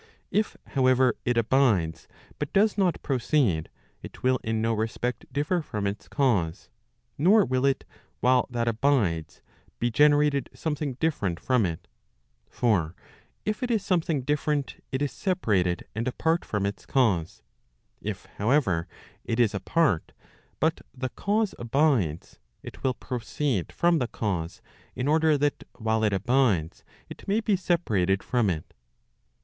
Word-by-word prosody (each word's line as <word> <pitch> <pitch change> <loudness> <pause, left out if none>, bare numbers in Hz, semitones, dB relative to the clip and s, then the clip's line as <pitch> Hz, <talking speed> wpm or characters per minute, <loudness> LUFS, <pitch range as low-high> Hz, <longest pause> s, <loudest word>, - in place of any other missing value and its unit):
If, 215 +1 0
however, 130 -2 +3
it 125 -1 +1
abides, 105 -10 +2 0.3
but 150 - -3
does 210 +2 +4
not 190 -5 +1
proceed, 125 - +1 0.3
it - - -11
will 130 0 +3
in 110 0 -1
no 115 +1 +1
respect 115 +3 -2
differ 155 +5 0
from 105 -9 -4
its 100 +1 -4
cause, 105 - 0 0.5
nor 195 +6 +5
will 130 +1 +1
it, 135 - +1 0.4
while 125 0 +3
that 120 -1 -2
abides, 110 - 0 0.3
be 120 0 0
generated 145 +1 +3
something 150 -3 -2
different 115 - -1
from 125 -6 +2
it 80 -2 -6 0.6
For 95 -9 +1 0.5
if 215 +5 -2
it 250 - -1
is 220 -4 0
something 165 -7 0
different 150 0 -1
it 130 +2 -1
is 145 - -1
separated 105 - 0
and 115 +3 -3
apart 160 +6 0
from 105 -2 -1
its 100 0 -5
cause* 100 - +1 0.6
If, - - -5
however, 105 - +2 0.4
it 115 - -2
is 115 -4 +3
apart, 100 - +1 0.5
but 160 +1 +1 0.2
the 130 0 -2
cause 210 - 0
abides, 120 - 0 0.2
it - - -10
will 130 -1 +1
proceed 125 - -2
from 170 -1 +2
the 125 - 0
eause, 90 -9 -3 0.3
in 125 - -2
order 155 0 +4
that 145 0 0
while 110 -1 0
it 105 - +3
abides, 100 - +1 0.2
it - - -11
may 205 +3 +2
be 215 -2 +1
separated 110 - +1
from 120 -5 +1
it. 80 -4 -4
125 Hz, 145 wpm, -26 LUFS, 105-150 Hz, 0.6 s, nor